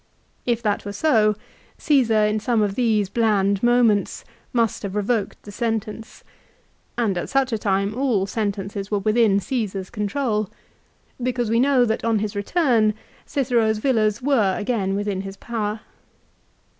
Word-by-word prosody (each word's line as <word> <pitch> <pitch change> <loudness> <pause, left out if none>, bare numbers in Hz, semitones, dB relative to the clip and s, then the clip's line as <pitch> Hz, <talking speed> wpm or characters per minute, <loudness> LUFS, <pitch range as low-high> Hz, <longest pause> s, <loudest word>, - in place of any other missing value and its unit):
If 235 -1 0
that 205 -2 0
were 205 - -6
so, 215 -4 +3 0.4
Caesar 230 -8 +3
in 210 +1 0
some 225 0 +1
of 200 -1 -1
these 215 -3 +1
bland 200 -2 +1
moments 240 -4 +2 0.3
must 230 -4 0
have 200 -1 -5
revoked 210 0 -1
the 205 - -10
sentence, 225 0 -4 0.7
and 210 -7 0
at - - -5
such 270 -2 +1
a - - +1
time 200 0 0
all 240 -6 +1
sentences 200 -1 -3
were 210 - 0
within 215 0 +3
Caesar's 200 -5 -3
control, 215 -1 -1 0.7
because 245 -2 -1
we 230 - +3
know 260 -1 +4
that 220 -1 -1
on 230 -1 +2
his 210 0 -3
return 220 - +2 0.3
Cicero's 235 -6 +1
villas 215 -2 +1
were 225 -9 +2
again 205 -3 -1
within 200 -1 -2
his 195 0 -7
own - - -34
power. 220 -2 -3
215 Hz, 150 wpm, -22 LUFS, 205-240 Hz, 0.7 s, know